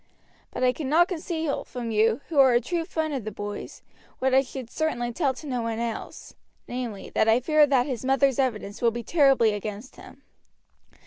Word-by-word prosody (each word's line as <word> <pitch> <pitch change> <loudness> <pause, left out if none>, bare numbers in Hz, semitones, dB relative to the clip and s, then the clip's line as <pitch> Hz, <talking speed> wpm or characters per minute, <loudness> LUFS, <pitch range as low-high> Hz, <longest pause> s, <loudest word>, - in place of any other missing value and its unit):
But - - -4
I 250 0 +4
cannot 315 +5 +2
conceal 325 -4 -3
from 240 -2 -6
you, 225 +3 +2
who 310 -4 +1
are 265 -2 +7
a 240 - +5
true 335 +5 -3
friend 315 -2 -2
of 265 -5 -3
the 215 - -5
boy's, 205 0 -7 0.3
what 260 0 0
I 265 - +6
should 255 -2 -8
certainly 240 -7 -2
tell 270 -1 0
to 305 - -11
no 250 -4 -2
one 230 -1 -3
else, 230 -1 -5 0.3
namely, 240 -5 -5
that 220 - +3
I 225 +2 +5
fear 305 +3 +4
that 265 -3 +3
his 260 -4 -4
mother's 270 0 +2
evidence 215 -6 -2
will 235 - +4
be 235 +1 -5
terribly 270 -6 +4
against 210 +4 -6
him. - - -14
255 Hz, 195 wpm, -25 LUFS, 230-285 Hz, 0.3 s, are